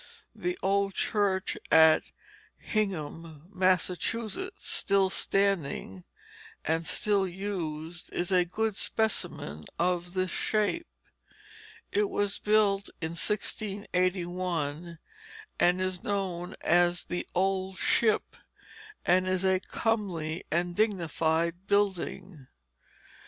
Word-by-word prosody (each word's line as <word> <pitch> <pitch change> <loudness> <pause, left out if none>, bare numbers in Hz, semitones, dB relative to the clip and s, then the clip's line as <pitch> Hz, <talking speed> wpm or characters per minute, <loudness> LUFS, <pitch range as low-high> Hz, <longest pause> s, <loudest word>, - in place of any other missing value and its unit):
The 360 +1 -3
old 195 0 +1
church 200 -3 +1 0.2
at 160 0 +7 0.5
Hingham, 165 -6 -3
Massachusetts, 195 - 0
still 195 -1 +2
standing 170 - 0 0.6
and 165 +1 0
still 200 -2 +1
used, 175 -3 -5
is 175 +2 -2
a 180 -1 +5
good 215 +4 -1
specimen 135 - -1
of 175 +1 0
this 185 -1 0
shape. 215 +11 0 1.0
It 415 -1 +2
was 205 0 0
built 205 -2 +2
in 160 -1 -3
1681, 180 -5 -2 0.6
and 180 +1 +4
is 185 -1 -2
known 185 -3 -2
as 175 +1 +3
the 175 - -3
"Old 190 0 0
Ship," 220 -3 +3 0.8
and 185 +1 +3
is 185 0 +1
a 190 0 +3
comely 185 -8 -2
and 175 +2 0
dignified 170 -3 0
building. 190 -6 -1
185 Hz, 95 wpm, -29 LUFS, 170-200 Hz, 1.0 s, at